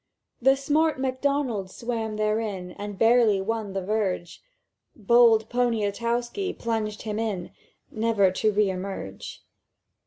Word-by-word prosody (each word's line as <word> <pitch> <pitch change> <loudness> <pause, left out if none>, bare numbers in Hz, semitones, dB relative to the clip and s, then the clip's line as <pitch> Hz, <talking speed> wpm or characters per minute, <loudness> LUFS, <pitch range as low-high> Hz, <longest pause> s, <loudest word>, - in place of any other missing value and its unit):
"The 270 +2 +5
smart 300 +2 +1
Macdonald 260 -6 -1
swam 225 0 -4
therein, 210 -4 -2
And 205 +1 -7
barely 225 -2 +4
won 210 0 -3
the 195 -1 -2
verge; 190 -5 -2 0.5
Bold 225 0 +4
Poniatowski 235 - -1
plunged 220 -2 -3
him 215 -1 -3
in 205 -6 -3 0.4
Never 220 -4 +2
to 215 +3 +1
re 205 -1 +2
emerge. 185 - -7
220 Hz, 115 wpm, -25 LUFS, 200-240 Hz, 0.5 s, The